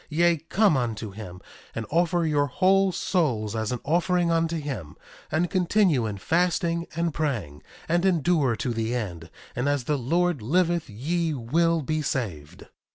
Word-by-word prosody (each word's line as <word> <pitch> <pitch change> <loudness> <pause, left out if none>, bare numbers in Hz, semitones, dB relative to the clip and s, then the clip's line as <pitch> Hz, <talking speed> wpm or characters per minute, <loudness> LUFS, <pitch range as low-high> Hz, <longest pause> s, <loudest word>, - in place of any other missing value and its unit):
Yea, 170 +2 +3
come 180 +4 +2
unto 115 -4 -2
him, 95 -3 -9 0.4
and 115 - -3
offer 170 +1 +2
your 145 -2 +2
whole 190 +6 +3
souls 125 - 0
as 110 0 -2
an 125 - -2
offering 175 +2 +2
unto 165 0 +1
him, 135 - -5 0.4
and 165 +3 0
continue 180 - +2
in 105 -2 -4
fasting 170 - 0
and 170 -1 -1
praying, 120 - -3 0.3
and 175 +2 +1
endure 165 -8 +2
to 120 +2 -2
the 115 +1 -2
end; 85 -8 -5 0.3
and 125 +4 0
as 145 -3 0
the 145 +2 -1
Lord 170 +3 +1
liveth 170 +5 +1
ye 160 +9 -1
will 165 +6 +1
be 155 +3 -1
saved. 95 - -4
155 Hz, 160 wpm, -25 LUFS, 115-170 Hz, 0.4 s, Yea